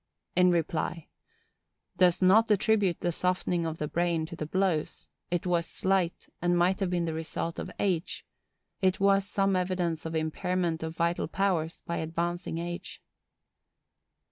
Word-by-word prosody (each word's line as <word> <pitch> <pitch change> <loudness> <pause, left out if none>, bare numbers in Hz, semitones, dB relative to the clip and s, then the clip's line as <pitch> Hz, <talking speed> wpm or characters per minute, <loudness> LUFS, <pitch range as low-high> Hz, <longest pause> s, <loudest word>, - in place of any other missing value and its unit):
In 180 0 +5 1.4
reply.—Does 180 0 +3
not 215 +5 +6
attribute 205 -3 +2
the 175 - +1
softening 180 -1 0
of 160 0 -4
the 150 - -2
brain 170 0 0
to 170 +1 -8
the 155 - -5
blows; 185 -3 -1 0.2
it 175 0 -1
was 175 -2 +1
slight, 185 -3 0
and 175 0 +2
might 180 +2 +3
have 195 -3 0
been 175 -1 0
the 165 - -2
result 165 +1 -4
of - - -5
age; 185 -3 -1 0.6
it 190 -1 +2
was 195 0 +3
some 195 -1 +1
evidence 180 -3 -1
of 160 0 -4
impairment 165 +1 -1
of 160 0 -4
vital 170 0 0
powers 175 -2 -1
by 170 - -2
advancing 170 +1 -2
age. 175 +1 -5
175 Hz, 145 wpm, -29 LUFS, 165-185 Hz, 1.4 s, not